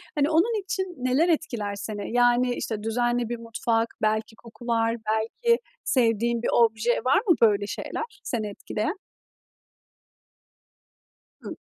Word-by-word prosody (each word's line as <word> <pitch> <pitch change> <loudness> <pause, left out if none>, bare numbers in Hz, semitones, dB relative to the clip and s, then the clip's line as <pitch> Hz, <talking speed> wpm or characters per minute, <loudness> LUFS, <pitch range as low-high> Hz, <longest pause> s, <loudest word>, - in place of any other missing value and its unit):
Hani, 290 +1 +2
onun 415 +7 +2
için 380 -2 -3
neler 255 +7 +2
etkiler 240 -11 -1
seni? 205 +2 -5
Yani, 245 0 +3
işte, 215 -2 -4
düzenli 240 +1 0
bir 240 - -3
mutfak, 230 0 -1
belki 220 +1 0
kokular, 230 0 -2 0.2
belki 350 - +1 0.2
sevdiğin 235 -1 +1
bir - - +1
obje 230 0 +3
var 270 +9 +4
mı? 345 - +6
Böyle 205 -2 +4
şeyler - - -4 0.2
seni 220 -4 -2
etkileyen? 215 - -4 2.4
Hı. - - -7
235 Hz, 125 wpm, -25 LUFS, 220-260 Hz, 2.4 s, mı